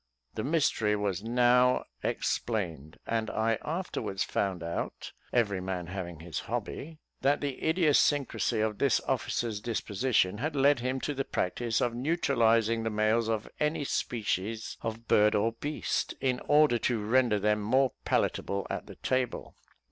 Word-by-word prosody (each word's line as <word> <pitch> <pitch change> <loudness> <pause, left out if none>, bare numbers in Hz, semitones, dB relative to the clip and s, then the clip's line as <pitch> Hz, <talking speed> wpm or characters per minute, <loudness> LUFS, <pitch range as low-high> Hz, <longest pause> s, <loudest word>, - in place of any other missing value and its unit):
The 110 - -3
mystery 135 -8 +2
was 100 -3 -1
now 125 +2 +3 0.2
explained, 85 - -2
and 115 -1 -1
I 110 0 0
afterwards 155 - -2
found 95 -4 -2
out 85 0 -4 0.2
(every 105 -6 +1
man 90 -2 -3
having 85 -3 -6
his 85 -1 -4
hobby) 160 +2 -5 0.2
that 140 +2 +3
the 140 -3 -4
idiosyncrasy 145 - +2
of 110 -1 -1
this 140 -4 +3
officer's 115 -3 -2
disposition 105 -3 0
had 150 +3 -2
led 140 0 +4
him 130 +2 -2
to 145 - -2
the 135 0 -2
practice 115 +1 -1
of 120 -1 +1
neutralising 115 -5 +2
the 110 - -1
males 110 +1 +1
of 110 -2 -1
any 150 0 0
species 110 -4 -2
of 115 +1 -5
bird 105 +1 +4
or 110 +2 +2
beast, 145 +6 -2
in 130 -2 0
order 145 -5 +5
to 115 -4 0
render 120 -1 +3
them 105 +1 +1
more 130 +5 +2
palatable 100 0 0
at - - -4
the - - -10
table. 130 -2 -2
115 Hz, 150 wpm, -29 LUFS, 105-130 Hz, 0.2 s, order